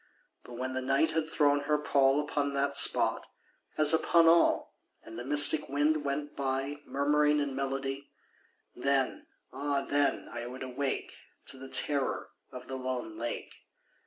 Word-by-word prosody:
But 125 Hz, -, -13 dB
when 130 Hz, +2 st, -5 dB
the 130 Hz, -, -3 dB
Night 135 Hz, +5 st, 0 dB
had 160 Hz, 0 st, -3 dB
thrown 145 Hz, -2 st, +1 dB
her 150 Hz, 0 st, 0 dB
pall 140 Hz, -1 st, +1 dB
Upon 145 Hz, -1 st, -3 dB
that 140 Hz, 0 st, -2 dB
spot, 140 Hz, -, +5 dB, 0.5 s
as 155 Hz, 0 st, +6 dB
upon 165 Hz, +1 st, +2 dB
all, 165 Hz, +1 st, +2 dB, 0.3 s
And 115 Hz, +1 st, -11 dB
the -, -, -6 dB
mystic 145 Hz, +3 st, +7 dB
wind 145 Hz, +2 st, 0 dB
went 145 Hz, +1 st, -5 dB
by 135 Hz, +1 st, -4 dB
Murmuring 150 Hz, +1 st, +1 dB
in 140 Hz, -2 st, -3 dB
melody— 135 Hz, 0 st, -5 dB, 0.7 s
Then—ah 140 Hz, +1 st, -3 dB
then 145 Hz, +1 st, -1 dB
I 120 Hz, 0 st, -7 dB
would 130 Hz, +2 st, -9 dB
awake 130 Hz, +1 st, -5 dB, 0.4 s
To -, -, -3 dB
the 135 Hz, 0 st, -11 dB
terror 140 Hz, -1 st, -1 dB, 0.2 s
of 125 Hz, 0 st, -10 dB
the 130 Hz, -, -6 dB
lone 130 Hz, -4 st, -6 dB
lake. 120 Hz, 0 st, -6 dB
140 Hz, 150 wpm, -28 LUFS, 130-145 Hz, 0.7 s, mystic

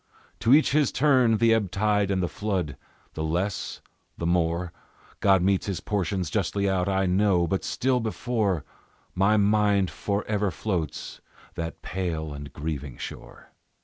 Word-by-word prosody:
To 115 Hz, -, +2 dB
each 155 Hz, -, +4 dB
his 150 Hz, 0 st, +3 dB
turn 130 Hz, -6 st, +4 dB
the 115 Hz, +1 st, +4 dB
ebb 105 Hz, -4 st, +1 dB
tide 105 Hz, +1 st, +1 dB
and 95 Hz, -2 st, +1 dB
the -, -, +1 dB
flood, 90 Hz, -8 st, -2 dB, 0.4 s
The 80 Hz, -, -4 dB
less, 90 Hz, +5 st, -2 dB, 0.4 s
the 85 Hz, -, -3 dB
more 85 Hz, 0 st, 0 dB, 0.5 s
God 95 Hz, -3 st, +4 dB
metes 95 Hz, +1 st, +1 dB
his 95 Hz, -3 st, -2 dB
portions 95 Hz, -4 st, -2 dB
justly 100 Hz, -1 st, 0 dB
out, 95 Hz, -1 st, +1 dB
I 95 Hz, 0 st, +1 dB
know; 95 Hz, -1 st, +3 dB
But 95 Hz, +3 st, -1 dB
still 130 Hz, 0 st, 0 dB
before 110 Hz, -, -1 dB, 0.5 s
My 100 Hz, +3 st, +3 dB
mind 105 Hz, -2 st, +3 dB
forever 105 Hz, 0 st, -1 dB
floats 85 Hz, -, -4 dB, 0.3 s
that 80 Hz, -1 st, -6 dB
pale 80 Hz, -4 st, -3 dB
and 70 Hz, -1 st, -8 dB
grieving 75 Hz, -4 st, -5 dB
shore. -, -, -9 dB
95 Hz, 145 wpm, -26 LUFS, 85-105 Hz, 0.5 s, each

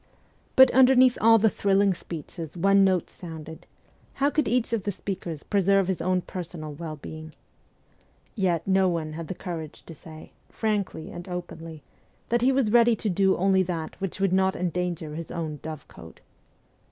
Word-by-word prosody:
But 260 Hz, -1 st, +8 dB
underneath 255 Hz, -1 st, +6 dB
all 225 Hz, +1 st, +7 dB
the 220 Hz, 0 st, +3 dB
thrilling 200 Hz, -1 st, +2 dB
speeches, 165 Hz, -1 st, -8 dB
one 195 Hz, +3 st, +4 dB
note 185 Hz, -3 st, +2 dB
resounded: 160 Hz, -2 st, -9 dB, 0.5 s
How 280 Hz, +1 st, +1 dB
could 305 Hz, -4 st, 0 dB
each 235 Hz, 0 st, 0 dB
of 230 Hz, -, +1 dB
the 205 Hz, -, -2 dB
speakers 180 Hz, -5 st, -6 dB
preserve 195 Hz, -1 st, +2 dB
his 190 Hz, -3 st, -2 dB
own 185 Hz, +1 st, +1 dB
personal 165 Hz, -4 st, -7 dB
well 155 Hz, +1 st, -6 dB
being? 155 Hz, +1 st, -9 dB, 1.0 s
Yet 175 Hz, -6 st, 0 dB
no 190 Hz, -1 st, +3 dB
one 160 Hz, -3 st, -3 dB
had 165 Hz, 0 st, -6 dB
the 190 Hz, -, -5 dB
courage 165 Hz, -5 st, -7 dB
to 165 Hz, -, -11 dB
say, 155 Hz, 0 st, -13 dB, 0.2 s
frankly 205 Hz, -6 st, -2 dB
and 175 Hz, +2 st, -9 dB
openly, 165 Hz, -3 st, -7 dB, 0.5 s
that 240 Hz, 0 st, +1 dB
he 255 Hz, +2 st, +4 dB
was 260 Hz, -5 st, +1 dB
ready 235 Hz, 0 st, +5 dB
to 215 Hz, -1 st, -2 dB
do 190 Hz, +1 st, +2 dB
only 190 Hz, +1 st, +3 dB
that 170 Hz, -3 st, -4 dB
which 195 Hz, -1 st, -4 dB
would 195 Hz, -2 st, +1 dB
not 190 Hz, 0 st, +2 dB
endanger 175 Hz, -3 st, -3 dB
his 165 Hz, +1 st, -6 dB
own 155 Hz, -3 st, -4 dB
dovecote. 150 Hz, -, -10 dB
185 Hz, 165 wpm, -26 LUFS, 165-200 Hz, 1.0 s, But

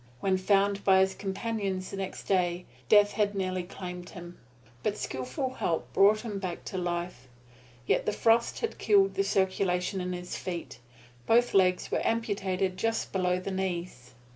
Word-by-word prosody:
When 190 Hz, +4 st, +1 dB
found 200 Hz, +1 st, +2 dB
by 190 Hz, -1 st, +5 dB
his 190 Hz, 0 st, +2 dB
companions 195 Hz, -2 st, -3 dB
the 195 Hz, -, -5 dB
next 190 Hz, -1 st, -5 dB
day, 180 Hz, -2 st, 0 dB, 0.2 s
death 205 Hz, -1 st, +6 dB
had 205 Hz, -1 st, 0 dB
nearly 185 Hz, -1 st, -1 dB
claimed 180 Hz, 0 st, -8 dB
him. 175 Hz, -1 st, -10 dB, 0.4 s
But 210 Hz, +8 st, -1 dB
skilful 130 Hz, -, -3 dB
help 165 Hz, -9 st, -2 dB
brought 210 Hz, +2 st, +5 dB
him 210 Hz, -4 st, -5 dB
back 185 Hz, -3 st, -5 dB
to 190 Hz, -, -5 dB
life, 175 Hz, -6 st, -4 dB, 0.6 s
yet -, -, +1 dB
the -, -, +3 dB
frost 230 Hz, +2 st, +2 dB
had 455 Hz, -, -3 dB
killed 195 Hz, -2 st, +4 dB
the 195 Hz, +1 st, +1 dB
circulation 190 Hz, -1 st, 0 dB
in 180 Hz, 0 st, -3 dB
his 180 Hz, 0 st, -5 dB
feet. 170 Hz, -8 st, -6 dB, 0.5 s
Both 240 Hz, +2 st, +4 dB
legs 185 Hz, -2 st, +3 dB
were -, -, +1 dB
amputated 195 Hz, -5 st, -1 dB
just 225 Hz, +1 st, -1 dB
below 180 Hz, -1 st, +1 dB
the 190 Hz, +2 st, -5 dB
knees. 175 Hz, -10 st, -4 dB
190 Hz, 165 wpm, -29 LUFS, 180-200 Hz, 0.6 s, death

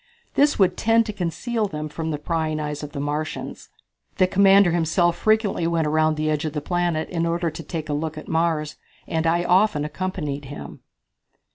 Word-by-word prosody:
This 290 Hz, +1 st, +3 dB
would 185 Hz, -3 st, +3 dB
tend 225 Hz, 0 st, +3 dB
to 210 Hz, -, -4 dB
conceal 210 Hz, +5 st, -2 dB
them 155 Hz, -4 st, -5 dB
from 160 Hz, +2 st, -4 dB
the 150 Hz, -, -1 dB
prying 155 Hz, 0 st, -2 dB
eyes 150 Hz, -1 st, -4 dB
of 150 Hz, -1 st, -7 dB
the 140 Hz, -, -5 dB
Martians. 150 Hz, +2 st, -4 dB, 0.5 s
The 185 Hz, -, +5 dB
commander 195 Hz, 0 st, +5 dB
himself 170 Hz, +1 st, +2 dB
frequently 215 Hz, -6 st, +1 dB
went 165 Hz, -1 st, +1 dB
around 155 Hz, 0 st, +2 dB
the 155 Hz, 0 st, -1 dB
edge 150 Hz, -1 st, -1 dB
of 155 Hz, -2 st, -3 dB
the 150 Hz, -, -1 dB
planet 175 Hz, 0 st, -1 dB
in 170 Hz, -2 st, 0 dB
order 170 Hz, 0 st, 0 dB
to 155 Hz, -, -7 dB
take 160 Hz, -2 st, -5 dB
a 150 Hz, -, -2 dB
look 155 Hz, +1 st, -3 dB
at 155 Hz, -, -8 dB
Mars, 160 Hz, -2 st, 0 dB, 0.3 s
and 160 Hz, 0 st, 0 dB
I 170 Hz, +1 st, +2 dB
often 180 Hz, -4 st, +3 dB
accompanied 150 Hz, -3 st, -4 dB
him. 145 Hz, +2 st, -9 dB
165 Hz, 190 wpm, -23 LUFS, 155-185 Hz, 0.5 s, The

